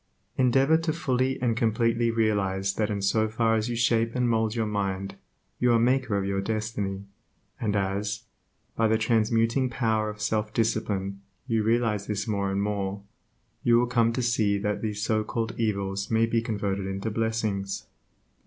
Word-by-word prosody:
Endeavor 135 +4 +4
to 165 0 -1
fully 130 -2 0
and 115 -2 +2
completely 115 +1 +1
realize 100 -4 +1
that 105 -1 -1
in 100 -2 -2
so 110 +2 +2
far 115 +1 +1
as 110 +1 0
you 120 - -2
shape 115 -1 +1
and 125 -1 +2
mould 110 -1 +1
your 115 -1 0
mind, 100 -2 -2 0.5
you 125 - +3
are - - +5
the 115 - +4
maker 125 -2 +2
of 100 - -1
your 100 0 -1
destiny, 105 -2 -3 0.6
and 105 -3 -1
as, 100 +1 -1 0.5
by 115 - +3
the 110 0 +3
transmuting 115 +3 +2
power 110 -3 0
of 105 0 -8
self 105 0 -1
discipline 100 -3 -1 0.2
you 115 -4 +1
realize 110 -2 +1
this 105 0 -2
more 100 -2 0
and 100 +1 0
more, 100 -1 -2 0.6
you 120 -1 +4
will 120 - +3
come 120 -2 +2
to 125 +2 -2
see 110 -4 +2
that 105 0 -2
these 105 -2 -3
so 110 0 +1
called 115 +1 -3
evils 100 -3 -1
may 115 0 +3
be 115 0 +1
converted 100 -3 -2
into 100 +3 -3
blessings. 110 -3 -2
110 Hz, 175 wpm, -27 LUFS, 100-115 Hz, 0.6 s, are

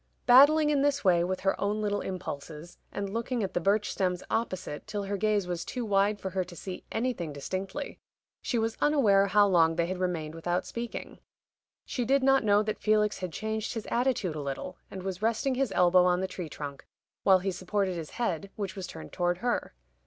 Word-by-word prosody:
Battling 295 +5 +7
in 285 -2 +2
this 285 -3 +1
way 175 -2 +5
with 185 +1 -2
her 195 - +2
own 205 +2 0
little 205 -1 -1
impulses, 165 -3 -6
and 200 -1 -4
looking 230 0 -1
at 195 - -3
the - - +1
birch 205 +4 +2
stems 180 -2 -1
opposite 185 -9 -3
till 205 -1 -3
her 200 +1 -2
gaze 210 -1 +1
was 175 -1 -3
too 245 -2 -4
wide 205 0 +2
for 190 - -4
her 185 0 0
to 175 -1 -12
see 185 +2 -7
anything 225 -9 -2
distinctly, 190 - -5 0.4
she 245 - -1
was 225 0 0
unaware 215 -10 +4
how 205 +1 +5
long 165 -4 +4
they 170 0 +1
had 185 +1 -4
remained 165 -4 -2
without 175 +2 -2
speaking. 235 0 -6 0.7
She 245 - -2
did 270 +3 +2
not 270 -1 +4
know 205 0 +4
that 215 0 -3
Felix 210 -1 +2
had 185 -2 -4
changed 220 +4 -3
his 225 - -4
attitude 240 -8 +1
a 150 - -3
little, 140 -1 -5
and 190 -1 -7
was 190 0 -4
resting 230 +5 +1
his 260 -3 0
elbow 180 0 +5
on 180 0 +3
the 190 - -1
tree 180 -3 -6
trunk, 140 -2 -7 0.3
while 190 -1 +6
he 190 +1 -2
supported 190 +1 -1
his 165 -3 -5
head, 200 -6 -2
which 200 -2 -4
was 190 -2 -5
turned 80 -1 -10
toward 175 0 0
her. 240 - -2
195 Hz, 205 wpm, -29 LUFS, 180-225 Hz, 0.7 s, Battling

